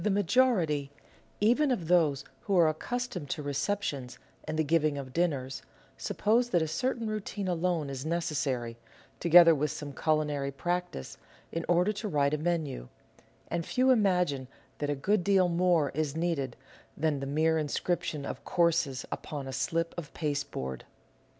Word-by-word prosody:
The 210 - +2
majority 195 - +2 0.3
— - - -32
even 285 +4 +3
of 190 -11 -1
those 160 -6 +3
who 200 -3 0
are 170 -2 +6
accustomed 180 - -3
to 150 - -3
recep 185 +9 -1
tions 130 -8 -4 0.3
and 155 - -3
the 160 - +3
giving 155 -1 +2
of 130 -2 -7
dinners 140 -6 -1 0.2
— - - -29 0.2
suppose 235 +3 +1
that 175 -7 +2
a - - -2
certain 235 - -1
routine 210 -2 -3
alone 175 -3 0
is 135 -1 -5
necessary, 140 -8 -2 0.4
together 170 0 +8
with 150 0 0
some 145 -2 -6
culinary 150 -2 0
practice, 175 - -3 0.3
in 165 0 -3
order 180 +4 +3
to 215 +1 -4
write 145 -5 +1
a 150 - 0
menu; 155 - -2 0.6
and 170 0 -1
few 255 +9 +2
imagine 180 - +2 0.3
that 145 - -1
a 145 - +1
good 190 +7 +1
deal 195 -2 +4
more 170 -4 +2
is 150 0 -2
needed 160 -7 -1 0.4
than 150 -2 0
the 135 - -4
mere 160 +3 +2
inscription 150 -1 -2
of - - -6
Courses 155 -6 +1
upon 145 -3 -5
a 135 - -5
slip 165 +4 -1
of 155 - -9
pasteboard. 145 - -3
160 Hz, 165 wpm, -29 LUFS, 145-180 Hz, 0.6 s, together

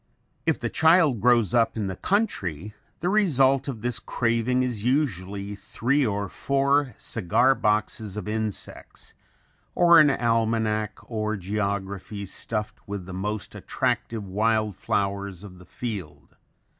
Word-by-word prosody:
If - - +2
the - - -3
child 160 - +4
grows 120 -5 +3
up 115 -1 +2
in 105 - -1
the 95 -1 -3
country, 105 - -1 0.3
the 175 - +1
result 135 -10 +3
of 120 -6 -5
this 120 -1 0
craving 115 +2 0
is 120 -5 -3
usually 100 - -1
three 130 +7 0
or 100 -3 -1
four 140 +2 +1
cigar 115 +6 +2
boxes 105 -2 -1
of 105 - -5
insects 110 -1 -5 0.6
or 170 -1 +7
an 150 - +7
almanac 110 -3 0
or 110 -2 -2
geography 100 +1 -3
stuffed 105 +3 -4
with 100 -2 -5
the 95 - -8
most 100 +3 -4
attractive 110 -3 -2
wild 110 +2 +1
flowers 100 -2 -2
of 90 -3 -11
the 90 - -15
field. 100 -11 -7
110 Hz, 130 wpm, -25 LUFS, 100-125 Hz, 0.6 s, or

